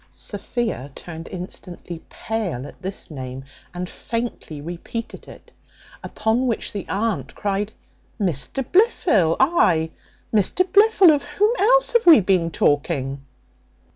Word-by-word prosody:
Sophia 205 - -4
turned 165 -1 -8
instantly 175 -2 -8
pale 205 - -3
at 145 - -12
this 190 -2 -6
name, 130 -2 -7 0.3
and 180 +1 -5
faintly 230 -9 -5
repeated 175 +9 -7
it. - - -14 0.5
Upon 225 +4 0
which 230 - -2
the 200 - -5
aunt 195 - -2
cried, 205 +1 -2 0.5
"Mr 185 - -1
Blifil 250 - +3
ay, 175 - +3 0.4
Mr 220 - +3
Blifil, 400 -3 +6
of 285 - -1
whom 400 +10 +1
else - - +4
have 470 -5 +3
we 325 -6 +10
been 185 -4 +2
talking?" 145 -3 0
200 Hz, 120 wpm, -22 LUFS, 160-250 Hz, 0.5 s, we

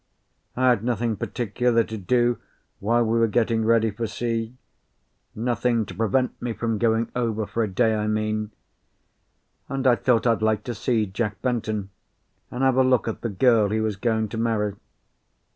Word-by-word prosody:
I 130 +1 +3
had 115 -4 +2
nothing 115 -1 0
particular 120 +2 0
to 110 - -7
do 120 +3 +1 0.4
while 115 +4 +2
we 115 +1 +1
were 115 - +4
getting 115 +1 +1
ready 115 -1 +3
for 115 +3 -3
sea; 115 +2 -3 0.8
nothing 120 0 0
to 95 - -9
prevent 115 +6 0
me 120 -1 -2
from 115 -1 -2
going 115 0 +1
over 115 -3 -1
for 115 - -2
a 110 - +1
day, 110 +3 +2
I 105 0 -1
mean; 110 0 -1 1.2
and 135 0 -3
I 125 -2 +6
thought 120 +2 +1
I'd 115 -2 +2
like 110 -1 +1
to 120 - -4
see 115 -1 0
Jack 105 +1 -3
Benton, 110 -5 -2 0.6
and 125 +2 -3
have 130 -1 +3
a 130 - +6
look 130 -2 +2
at 115 - -4
the 115 - -2
girl 110 +1 +3
he 110 +2 0
was 110 -2 -1
going 110 +1 0
to 110 - -5
marry. 110 -3 0
115 Hz, 175 wpm, -24 LUFS, 110-120 Hz, 1.2 s, I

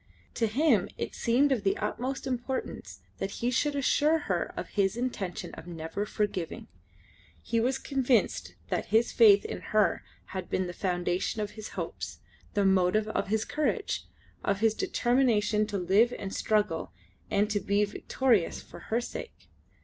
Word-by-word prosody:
To 225 - +1
him 235 - +3
it - - -4
seemed 260 +5 +2
of 255 -5 +2
the 195 -1 +1
utmost 265 +2 -3
importance 260 0 -4 0.2
that 195 - -2
he 240 +4 -2
should 290 +3 +1
assure 295 +3 +3
her 185 - -2
of - - -4
his 195 +1 +1
intention 225 -8 -3
of 165 - -10
never 170 +4 -4
forgiving. 195 -6 -2 0.8
He 230 - 0
was 255 +3 +1
convinced 260 -4 +1
that - - -1
his 225 +2 +3
faith 205 -4 +6
in - - -5
her 210 -5 +2 0.3
had 185 -2 -4
been 185 - 0
the 175 - -5
foundation 180 +2 -1
of 210 -1 -2
his 215 0 -8
hopes, - - -4 0.4
the 205 -1 +3
motive 190 +3 +3
of - - -1
his 215 +2 0
courage, 305 0 -1 0.4
of 200 0 0
his 220 0 +3
determination 220 -4 +2
to 205 -1 -2
live 200 +7 +3
and 195 -1 -5
struggle, 210 -6 0 0.4
and 205 +1 +2
to 205 - +1
be 200 +2 +2
victorious 215 -1 +1
for - - -12
her 230 +2 +2
sake. 350 - -8
215 Hz, 160 wpm, -29 LUFS, 195-245 Hz, 0.8 s, faith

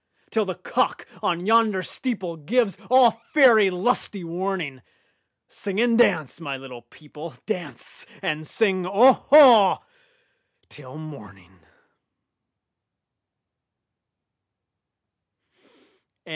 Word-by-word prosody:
Till 220 -2 0
the 185 - -5
cock - - -3
on 175 0 -2
yonder 220 -3 +2
steepleGives 195 - -3
all 240 -3 +4
faery 230 -9 +5
lusty 195 0 -2
warning, 170 -5 -5 0.7
Sing 200 0 -6
and 235 0 +2
dance, 160 - +1
my 140 -4 -5
little 130 -2 -12
people,—Dance 155 - -10
and 155 0 -4
sing 190 -3 -1
"Oho" 245 +1 +5 0.8
till 140 -1 -13
morning! 100 - -13
185 Hz, 75 wpm, -22 LUFS, 155-225 Hz, 0.8 s, faery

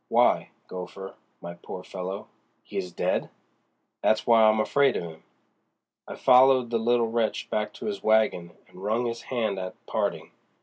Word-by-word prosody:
Why, - - +3 0.2
Gopher, 95 +1 -8 0.3
my 85 - -7
poor 90 +1 -9
fellow, 95 +3 -6 0.4
he - - -13
is 90 - -3
dead!" - - -1 0.7
"That's 110 - +2
why 115 -1 +5
I'm 110 0 +4
afraid 135 +4 +2
of - - -4
'im." 80 -2 -10 0.8
I - - -7
followed 130 -1 +5
the 115 - +1
little 115 0 +2
wretch 115 -2 -1
back 105 0 -1
to - - -9
his 210 -1 -3
wagon 110 -6 +1
and 90 - -15
wrung 110 +4 0
his 115 0 -3
hand 115 -5 -2
at 90 0 -6
parting. - - -2
110 Hz, 165 wpm, -26 LUFS, 95-120 Hz, 0.8 s, why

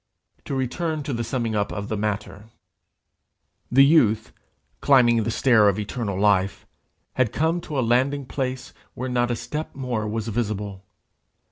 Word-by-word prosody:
To 140 - -3
return 150 +4 -2
to 140 - -4
the 120 0 -2
summing 115 -1 -2
up 100 -1 0
of 100 0 -5
the 110 - -2
matter: 105 0 -3 1.3
The 135 +3 +7
youth, 110 -8 +3 0.5
climbing 120 -4 +4
the 110 - -2
stair 115 -3 +4
of 100 - -1
eternal 105 -2 -3
life, 100 -2 +2 0.5
had 130 -4 +1
come 160 +6 0
to 155 -4 -5
a - - +2
landing 130 +4 +1
place 130 -1 -4 0.2
where 130 +1 -4
not 120 -1 +1
a 120 - 0
step 150 +6 -5
more 125 -5 -3
was 110 +1 -3
visible. 105 -3 -3
120 Hz, 155 wpm, -24 LUFS, 105-135 Hz, 1.3 s, The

